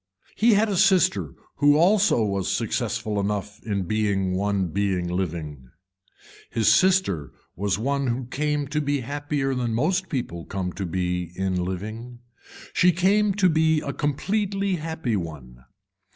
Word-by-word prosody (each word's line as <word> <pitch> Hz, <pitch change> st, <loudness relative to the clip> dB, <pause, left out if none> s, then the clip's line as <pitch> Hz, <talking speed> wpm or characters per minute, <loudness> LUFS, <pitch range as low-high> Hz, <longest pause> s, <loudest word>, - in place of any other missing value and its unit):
He 225 Hz, 0 st, +4 dB
had 215 Hz, +2 st, +3 dB
a 200 Hz, -3 st, -1 dB
sister 100 Hz, -, +3 dB, 0.2 s
who 145 Hz, +1 st, +5 dB
also 185 Hz, -, +4 dB
was 100 Hz, -2 st, -1 dB
successful 105 Hz, -1 st, -1 dB
enough 100 Hz, 0 st, -3 dB
in 100 Hz, -3 st, -1 dB
being 100 Hz, -1 st, 0 dB
one 100 Hz, -1 st, 0 dB
being 95 Hz, -1 st, -1 dB
living. 80 Hz, -7 st, -4 dB, 0.8 s
His 110 Hz, -2 st, 0 dB
sister 185 Hz, -, +2 dB, 0.2 s
was 100 Hz, +1 st, -1 dB
one 140 Hz, +4 st, -1 dB
who 125 Hz, +1 st, -2 dB
came 150 Hz, +3 st, -1 dB
to 150 Hz, +1 st, 0 dB
be 145 Hz, -1 st, -1 dB
happier 145 Hz, +1 st, -2 dB
than 120 Hz, -3 st, -1 dB
most 180 Hz, +9 st, 0 dB
people 85 Hz, -, -4 dB
come 90 Hz, -2 st, -4 dB
to 95 Hz, 0 st, -4 dB
be 90 Hz, 0 st, -2 dB
in 95 Hz, -1 st, -1 dB
living. 110 Hz, +7 st, -6 dB, 0.6 s
She 180 Hz, 0 st, +5 dB
came 195 Hz, +3 st, +2 dB
to 200 Hz, -3 st, +4 dB
be 160 Hz, -1 st, +3 dB
a 140 Hz, -, -4 dB
completely 195 Hz, +6 st, -1 dB
happy 160 Hz, -7 st, -3 dB
one. 70 Hz, -9 st, -7 dB
115 Hz, 145 wpm, -24 LUFS, 95-160 Hz, 0.8 s, who